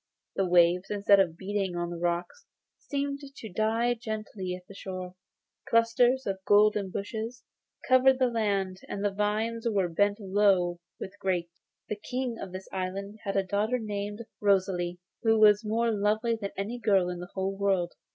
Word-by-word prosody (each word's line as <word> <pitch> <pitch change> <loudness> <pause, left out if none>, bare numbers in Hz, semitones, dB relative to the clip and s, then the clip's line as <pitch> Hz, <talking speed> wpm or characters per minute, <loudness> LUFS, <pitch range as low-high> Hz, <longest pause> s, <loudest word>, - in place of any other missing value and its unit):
The 195 - +1
waves, 175 +1 +4
instead 200 -1 +4
of 170 -4 +2
beating 195 -1 -2
on 175 0 -2
the 170 - -5
rocks, 175 - -2 0.3
seemed 280 -1 -3
to 275 -5 -10
die 225 +3 +1
gently 215 -5 -5
on 180 - -10
the - - -11
shore; 185 -2 -6 0.6
clusters 240 +3 +3
of 195 -1 -2
golden 205 0 +4
bushes 220 +5 -5 0.4
covered 255 +1 +5
the 260 - +3
land, 200 -5 0
and 200 0 -3
the 205 - +2
vines 220 +3 -1
were 195 -4 +1
bent 205 +5 +1
low 190 -3 +2 0.2
with 195 - -8
grapes. 175 -2 -2 0.3
The 210 - -3
King 245 +2 -3
of 190 - -6
this 185 +1 -8
island 195 +3 -4
had 195 - -2
a 195 - +3
daughter 210 +5 0
named 210 0 -4 0.2
Rosalie, 185 -3 +1 0.2
who 225 -1 +3
was 210 0 +6
more 230 +2 +1
lovely 215 +2 +1
than 205 -3 -4
any 215 +5 -3
girl 195 -6 +3
in 180 -1 -5
the 180 0 -8
whole 195 0 -1
world. 195 -3 0
205 Hz, 170 wpm, -28 LUFS, 185-225 Hz, 0.6 s, was